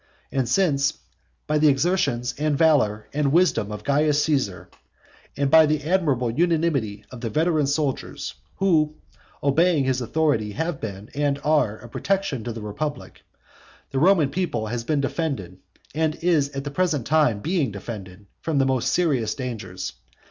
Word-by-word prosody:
And 130 -3 -1
since, 145 -8 +2 0.5
by 150 0 +1
the 155 - +5
exertions 135 -5 +1
and 150 -1 +1
valour 120 -10 +3
and 145 -1 +1
wisdom 145 - +2
of 105 0 -6
Caius 145 +1 +2
Caesar, 105 - -1 0.7
and 140 -1 0
by 160 -1 +7
the 150 -1 0
admirable 145 -9 +1
unanimity 150 -9 0
of 125 -2 -9
the 115 - -2
veteran 155 +3 +1
soldiers, 140 -1 -2 0.2
who, 155 -6 +2 0.5
obeying 155 +2 +3
his 130 -1 0
authority, 120 -6 0
have 160 +2 -3
been 100 0 -7
and 145 0 0
are 150 -9 +2
a 120 - -12
protection 175 - -1
to 120 - -3
the 110 -1 -7
republic, 145 +9 -5 0.7
the 135 - 0
Roman 165 -4 +4
people 155 -12 -1
has 115 +2 -3
been 145 +3 0
defended, 135 - -3 0.3
and 155 0 0
is 160 -5 +1
at 135 -1 -5
this 145 -1 -6
present 160 -9 0
time 150 -8 +3
being 155 - 0
defended, 100 -2 -8 0.2
from 160 -2 -1
the 135 - +3
most 130 -1 +1
serious 130 -11 +1
dangers. 105 -8 -5
140 Hz, 155 wpm, -24 LUFS, 115-155 Hz, 0.7 s, by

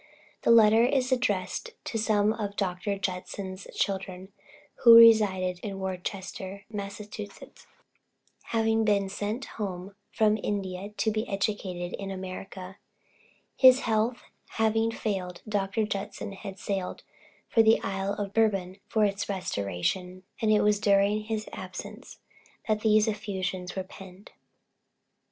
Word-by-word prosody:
The - - 0
letter 225 0 +7
is 260 0 +1
addressed 250 - -1
to 225 - -3
some 215 -1 +2
of 205 -3 -4
Dr. 195 +1 -2
Judson's 185 0 -5
children, 190 -1 -3 0.5
who 235 -2 +8
resided 200 -6 +6
in 195 0 -5
Worcester, 190 +1 -5
Massachusetts, 205 0 -8 0.8
having 225 -1 +1
been 200 -2 +2
sent 210 +6 -3
home 195 -2 -6 0.2
from 215 0 +2
India 195 -1 -3
to 210 +1 -1
be 215 +2 -2
educated 195 -3 -2
in 195 -1 -5
America. 190 0 -7 0.8
His 260 0 +7
health 225 +2 0 0.3
having 225 0 +2
failed, 190 -6 -4
Dr. 205 +1 0
J. 200 -1 -3 0.3
had 195 -2 -7
sailed 195 -2 -4 0.4
for 225 - +4
the 220 0 +5
Isle 195 +1 -2
of 200 -1 -4
Bourbon 195 -4 +1
for 215 -2 +2
its 200 0 -2
restoration, 180 - -2 0.2
and 220 -1 +3
it 210 -1 +4
was 210 0 +3
during 205 +1 +2
his 215 -1 -3
absence - - -8 0.5
that 215 -1 +1
these 215 0 +4
effusions 190 -4 -3
were 190 - -2
penned. 190 +1 -13
200 Hz, 125 wpm, -28 LUFS, 190-215 Hz, 0.8 s, who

